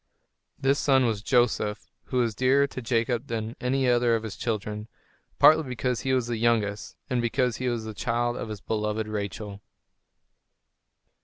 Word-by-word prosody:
This 135 +1 +1
son 135 -2 +3
was 110 -3 -1
Joseph, 110 -3 +1 0.2
who 130 - -3
was 120 -3 +2
dearer 130 +5 +3
to 135 -2 -7
Jacob 120 +2 0
than 115 0 -4
any 130 +1 +1
other 120 -1 +3
of 115 - -2
his 110 -3 -6
children, 105 -1 -3 0.5
partly 155 +1 +7
because 125 -3 -2
he 130 - -1
was 130 -2 +2
the 120 -1 -2
youngest, 110 -3 0
and 125 -3 0
because 125 0 0
he 130 -1 -1
was 120 -2 -2
the 110 0 -6
child 120 +2 -1
of 115 - -5
his 105 -2 -6
beloved 105 0 -2
Rachel. 105 -1 -5
115 Hz, 165 wpm, -26 LUFS, 110-125 Hz, 0.5 s, partly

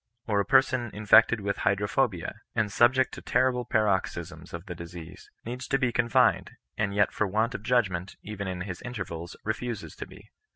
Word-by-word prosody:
Or 105 -2 +1
a 100 - +1
person 130 -3 +3
infected 110 +2 +5
with 100 0 -2
hydrophobia, 100 -1 0
and 110 -2 +1
subject 130 +4 +3
to - - -8
terrible 125 -1 +1
paroxysms 105 -5 -1
of 85 +1 -7
the 90 - -6
disease, 85 +1 -10 0.2
needs 125 +2 -5
to 135 - +2
be 130 -3 +1
confined; 120 0 +3 0.3
and 100 -2 -1
yet 100 -1 +3
for 105 - 0
want 110 +5 0
of - - -5
judgment, 100 -7 0
even 100 -2 -5
in 90 -1 -4
his 90 -1 -6
intervals, 95 -8 -6
refuses 110 -6 -4
to - - -6
be. - - -16
105 Hz, 175 wpm, -27 LUFS, 95-120 Hz, 0.3 s, infected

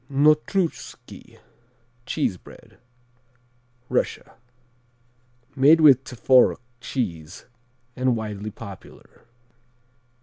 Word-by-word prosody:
Notruschki 155 +5 -1 0.7
(cheese 135 -9 -1
bread) - - -17 1.1
Russia - - -2 1.2
Made 145 +4 +5
with 135 -4 +6
Tworog 125 +1 +3 0.2
cheese 90 - -5 0.5
and 130 -1 0
widely 105 -2 -5
popular. 100 0 -13
125 Hz, 65 wpm, -23 LUFS, 105-145 Hz, 1.2 s, with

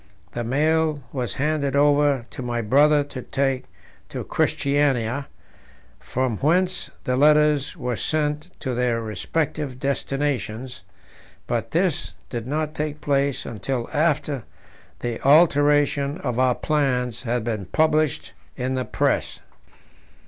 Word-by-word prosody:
The 120 - -3
mail 155 +3 +1
was 125 -3 -3
handed 140 -1 0
over 145 -3 +3
to - - -7
my 120 -1 -2
brother 145 +6 +4
to 140 -2 -8
take 135 0 -1 0.4
to - - -5
Christiania, 140 -2 +1 0.7
from 130 -4 -2
whence 180 - +1
the 125 - 0
letters 150 0 +4
were 125 -1 -2
sent 150 +4 -1
to 130 -3 -2
their 120 -1 +1
respective 130 +4 -3
destinations; 135 -4 -2 0.6
but - - -2
this - - 0 0.2
did 120 -1 -4
not 155 +2 -1
take 150 -1 -3
place 140 -2 0
until 120 +2 -3
after 150 -4 +1 0.6
the 120 -2 -3
alteration 145 -1 +4
of 125 -3 -2
our 130 -1 +3
plans 125 -6 0
had 120 -1 -1
been 110 -4 -3
published 155 0 +1 0.2
in 130 +1 -1
the 130 -1 -1
Press. - - 0
140 Hz, 120 wpm, -23 LUFS, 125-150 Hz, 0.7 s, brother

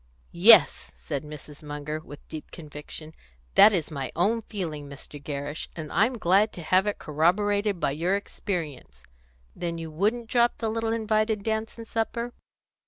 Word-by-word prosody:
"Yes," - - +8 0.2
said 65 - -4
Mrs. 150 -1 -10
Munger, 150 +1 -5
with 145 -2 -13
deep 155 -1 -8
conviction, 155 0 -8 0.4
"that 215 - +8
is 170 -6 -1
my 135 -3 -4
own 215 +7 +2
feeling, 160 -10 -5
Mr. 140 +1 -10
Gerrish, 145 +1 -4
and 155 -3 -6
I'm 225 +7 +2
glad 200 +2 +3
to 175 - -8
have 185 +5 +3
it 205 - -1
corroborated 200 +6 +1
by 140 - +1
your 170 +7 0
experience. 160 - -5 0.5
Then 170 -1 -3
you 165 -1 -6
wouldn't 215 +8 0
drop 240 +1 +2
the 225 - -2
little 225 0 -1
invited 215 -1 0
dance 220 +1 -2
and 230 - -8
supper?" 235 +2 -2
175 Hz, 160 wpm, -26 LUFS, 150-215 Hz, 0.5 s, Yes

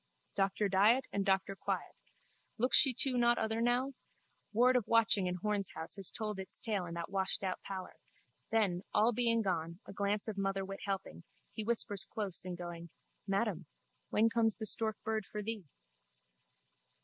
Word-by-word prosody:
Doctor 195 +1 +1
Diet 210 +7 +4
and 200 - 0
Doctor 195 0 0
Quiet. - - -3 0.6
Looks 250 +3 +3
she 270 - +8
too 250 0 +1
not 240 0 +3
other 220 +1 -1
now? 245 +3 +1 0.6
Ward 245 +4 +4
of 245 -4 +1
watching 225 -4 +3
in 180 - -2
Horne's 200 +1 -2
house 160 - -4
has 195 -2 +6
told 210 -3 -4
its 190 - -4
tale 205 -6 -2
in 170 - -7
that 170 +2 -5
washedout 190 -1 -1
pallor. 190 -2 -7 0.5
Then 205 -6 +1
all 220 +3 +4
being 230 -1 +1
gone, 170 -3 -2
a - - -10
glance 200 +2 -1
of 215 -2 -5
motherwit 195 0 -2
helping, 185 - -4 0.3
he 220 - -4
whispers 210 -4 0
close 200 -5 -4
in 180 -1 -4
going: 170 -1 -8 0.4
Madam, 195 -4 -1 0.4
when 220 +2 +3
comes 225 -1 +1
the 220 - -6
storkbird 220 0 +3
for 210 +1 -6
thee? 220 -3 -5
205 Hz, 160 wpm, -33 LUFS, 190-225 Hz, 0.6 s, she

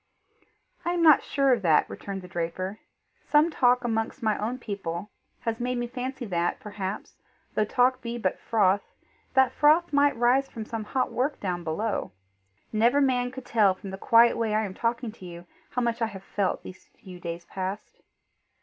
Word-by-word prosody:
"I 345 - 0
am 345 -1 +1
not 310 -4 +7
sure 275 -2 +2
of 235 - 0
that," 160 -5 +4
returned 195 -2 -7
the - - -9
draper. 180 +3 -4 0.4
"Some 305 +3 +3
talk 250 -3 +3
amongst 225 +2 -2
my 215 -1 +2
own 230 +4 -2
people 200 -4 -5 0.3
has 230 0 -2
made 250 +1 -1
me 240 - -1
fancy 255 +1 -5
that, 175 -4 -1
perhaps, 205 -1 -6 0.4
though 215 - +2
talk 255 +3 +2
be 235 -1 -4
but 190 -6 -1
froth, 205 -3 +2 0.5
the 265 -2 +5
froth 310 +3 +4
may 285 0 +5
rise 245 +3 +2
from 220 -2 -7
some 225 -1 -5
hot 255 +4 -1
work 270 +4 -1
down 180 -3 -3
below. 200 +7 -2 0.6
Never 235 +6 +4
man 250 -3 +2
could 260 0 -9
tell 205 -5 +3
from 190 +1 -9
the 190 - -6
quiet 230 +2 +5
way 220 -2 0
I 215 0 +1
am 190 - -6
talking 235 +2 -2
to 210 -4 -13
you, 170 0 -10 0.2
how 250 - -1
much 235 0 -1
I 225 - +2
have 195 -3 -9
felt 195 -1 -1
these 185 - -11
few 185 -2 -11
days 170 0 -6
past." 190 +3 -6
225 Hz, 185 wpm, -27 LUFS, 195-250 Hz, 0.6 s, not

